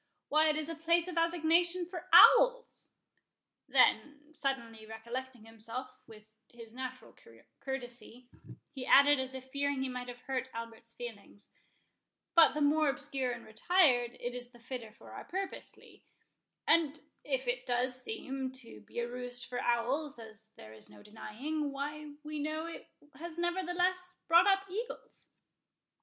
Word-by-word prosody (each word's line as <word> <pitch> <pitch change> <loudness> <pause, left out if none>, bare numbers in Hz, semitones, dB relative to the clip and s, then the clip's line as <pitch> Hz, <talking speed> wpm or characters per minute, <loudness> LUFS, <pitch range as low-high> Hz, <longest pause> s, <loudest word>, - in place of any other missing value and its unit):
—Why, 310 +1 +4
it 305 - +1
is 305 -1 -1
a 330 - -3
place 335 +2 +2
of 360 - -5
assignation 340 +1 +2
for 355 +1 -8
owls." - - +7 0.8
Then, 295 +1 +2
suddenly 235 -7 -3
recollecting 235 +2 -7
himself, 230 +3 -7 0.2
with 215 -1 -15 0.2
his 230 -2 -13
natural 255 0 -7 0.4
courtesy, 245 -2 -7 0.4
he 265 -3 -7
added, 285 0 +7
as 260 0 -4
if 260 0 -9
fearing 280 -1 0
he 265 - -2
might 250 -1 -5
have 245 0 -9
hurt 260 -1 -3
Albert's 230 0 -8
feelings—"But 240 +8 -2
the 300 - -1
more 300 +1 +4
obscure 265 -1 -2
and - - -7
retired, 245 - +3
it 245 0 -4
is 245 0 -6
the 245 - -18
fitter 235 -2 -7
for 220 - -15
our - - -8
purpose, 385 +1 -5
Lee; - - -19 0.6
and 320 -2 +3 0.2
if - - -2
it - - -2
does 250 +1 0
seem 270 -12 -4
to 235 - -8
be 100 - -15
a 235 0 0
roost 245 0 -6
for 245 - -4
owls, 255 +5 0
as 220 -1 -12
there 110 0 -12
is 110 - -11
no 105 -1 -15
denying, 280 +8 -4
why 295 +2 -5
we 305 0 -5
know 310 +2 -2
it 335 - -9 0.3
has 340 0 -7
nevertheless 360 +1 -1
brought 340 +3 +6
up 390 0 +4
eagles." 440 +6 -7
265 Hz, 150 wpm, -32 LUFS, 240-325 Hz, 0.8 s, owls